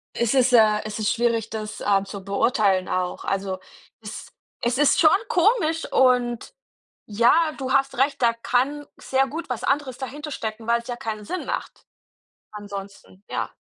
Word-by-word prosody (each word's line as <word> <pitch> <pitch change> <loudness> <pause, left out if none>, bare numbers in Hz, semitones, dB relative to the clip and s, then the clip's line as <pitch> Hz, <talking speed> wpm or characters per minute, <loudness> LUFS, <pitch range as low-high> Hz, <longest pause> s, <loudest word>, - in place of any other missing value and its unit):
Es 235 0 +1
ist, 255 -1 +3
äh 215 -2 +5
es 215 0 -5
ist 210 - +1
schwierig, 230 -2 0
das, 215 -1 -6
äh, 195 -1 +2
zu 195 -1 -8
beurteilen 200 -2 +1
auch. 180 -1 -2
Also 195 -1 -2 0.4
es - - -9 0.3
es 240 +2 0
ist 295 -2 +4
schon 310 -1 +7 0.2
komisch 345 -4 +2
und, 245 -2 +2 0.6
ja, 230 +3 +4 0.2
du 265 -1 -3
hast 275 -1 +1
recht, 275 +2 +1
da 235 -1 +4
kann 255 +5 -1
sehr 265 0 +1
gut 320 +1 -6
was 245 - -4
anderes 275 -3 0
dahinter 290 +3 -6
stecken, 225 -4 -5
weil's 235 +1 +1
ja 245 - -3
keinen 220 -4 -5
Sinn 365 - -5
macht. - - -5 0.6
Ansonsten, 200 -2 -9
ja. - - -2
235 Hz, 165 wpm, -23 LUFS, 210-270 Hz, 0.6 s, schon